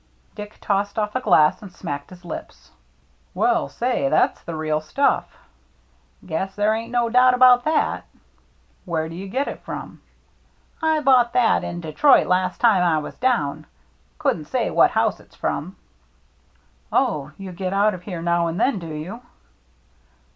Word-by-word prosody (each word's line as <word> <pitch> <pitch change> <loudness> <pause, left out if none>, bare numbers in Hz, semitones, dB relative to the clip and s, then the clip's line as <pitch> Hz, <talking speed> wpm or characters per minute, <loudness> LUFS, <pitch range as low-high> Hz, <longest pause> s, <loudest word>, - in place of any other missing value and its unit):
Dick 210 0 -9
tossed 200 +1 -1
off 210 0 -1
a 255 - 0
glass 155 -9 +4
and 200 -3 -10
smacked 145 -5 -6
his 180 -1 -14
lips. - - -9 0.3
" - - -38
Well, 355 -2 +1
say, 240 - -1
that's 155 - +2
the 165 - -7
real 155 -1 -1
stuff." 275 - 0 0.4
" - - -30
Guess 185 +3 -3
there 210 +1 +2
ain't 225 +1 -4
no 240 -1 +1
doubt 250 +2 +5
about 250 -1 +6
that." 310 0 0 0.4
" - - -38
Where 160 -3 -2
do 165 - -9
you 190 +3 -7
get 270 +7 -1
it - - -6
from? - - -8 0.3
" - - -38
" - - -35
I 315 -1 +2
bought 250 -4 +4
that 245 -3 +3
in 175 - -5
Detroit 170 - +4
last 185 0 0
time 220 -6 +4
I 170 -3 +2
was 150 - -5
down. 155 - 0 0.5
Couldn't - - -1
say - - -1
what - - +5
house - - 0
it's - - -20
from." 175 +7 -3 0.6
" - - -38
Oh, 150 - 0
you 195 -1 -8
get 185 +1 -4
out 205 +2 +2
of 180 - -8
here 175 -2 -6
now 170 0 +1
and 165 +3 -3
then, 235 -3 +1
do 170 - -8
you?" 170 +10 -7
195 Hz, 180 wpm, -22 LUFS, 165-245 Hz, 0.6 s, about